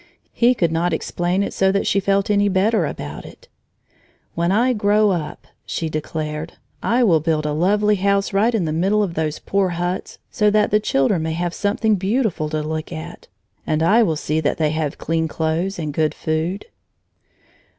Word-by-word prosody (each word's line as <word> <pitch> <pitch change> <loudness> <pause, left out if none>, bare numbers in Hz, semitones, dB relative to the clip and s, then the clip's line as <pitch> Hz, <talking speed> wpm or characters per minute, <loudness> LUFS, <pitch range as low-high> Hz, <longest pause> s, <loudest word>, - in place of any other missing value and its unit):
He 245 +1 +3
could 170 -7 +1
not 170 +2 0
explain 180 +3 -1
it - - -4
so 190 0 +2
that 200 0 0
she 200 - +2
felt 195 +1 +1
any 205 0 +3
better 195 -2 +2
about 75 - -7
it. - - -14 0.9
"When 170 +1 0
I 240 +5 +3
grow 210 -1 +3
up," 165 -5 -4 0.2
she 165 - -3
declared, 155 +1 -4 0.3
"I 245 +2 +2
will 170 -8 +4
build 155 -1 0
a 150 - 0
lovely 205 +6 +2
house 200 +1 +1
right 220 +4 +2
in 195 -6 0
the 155 - -2
middle 195 +6 +2
of 185 -4 -3
those 155 -2 -2
poor 195 -1 0
huts, 175 +1 -3
so 210 -1 +2
that 210 0 +2
the 210 - +4
children 160 -2 +1
may 160 0 -2
have 175 +1 -2
something 210 +2 +1
beautiful 195 -5 0
to 155 0 -2
look 155 0 -4
at; 80 0 -8 0.4
and 155 +1 +1
I 215 +8 +5
will 165 -8 +2
see 155 +1 -1
that 145 -2 0
they 155 -2 +1
have 155 -2 -2
clean 160 0 -1
clothes 160 +5 -2
and 155 -3 -4
good 155 0 0
food." 160 +5 -2
175 Hz, 190 wpm, -20 LUFS, 155-205 Hz, 0.9 s, I